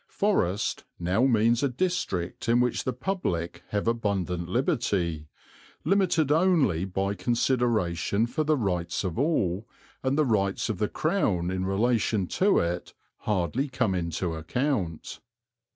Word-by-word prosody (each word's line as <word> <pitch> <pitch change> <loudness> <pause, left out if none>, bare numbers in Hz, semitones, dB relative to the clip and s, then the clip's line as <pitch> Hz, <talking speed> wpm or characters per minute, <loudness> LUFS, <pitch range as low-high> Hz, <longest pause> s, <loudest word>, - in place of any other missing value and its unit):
"Forest" 105 - 0
now 90 +8 +1
means 115 -1 +3
a 140 - +2
district 125 - -2
in 120 +1 +4
which 125 -1 0
the 130 - +1
public 125 - -3
have 105 +1 -2
abundant 95 -7 -1
liberty, 95 - 0 0.6
limited 170 -5 +2
only 150 - +3
by 95 +1 -1
consideration 115 -5 +1
for 155 +6 -1
the 155 0 +2
rights 90 -7 -1
of 95 +2 -3
all, 110 - 0 0.3
and 135 +2 0
the 155 - +3
rights 100 -3 0
of 105 -5 -2
the 105 - 0
Crown 100 - 0
in 95 0 -2
relation 110 0 +1
to 195 - +2
it 85 +1 -2 0.2
hardly 105 - -1
come 120 -6 0
into 85 -1 -2
account. 90 - -2
110 Hz, 135 wpm, -27 LUFS, 90-130 Hz, 0.6 s, in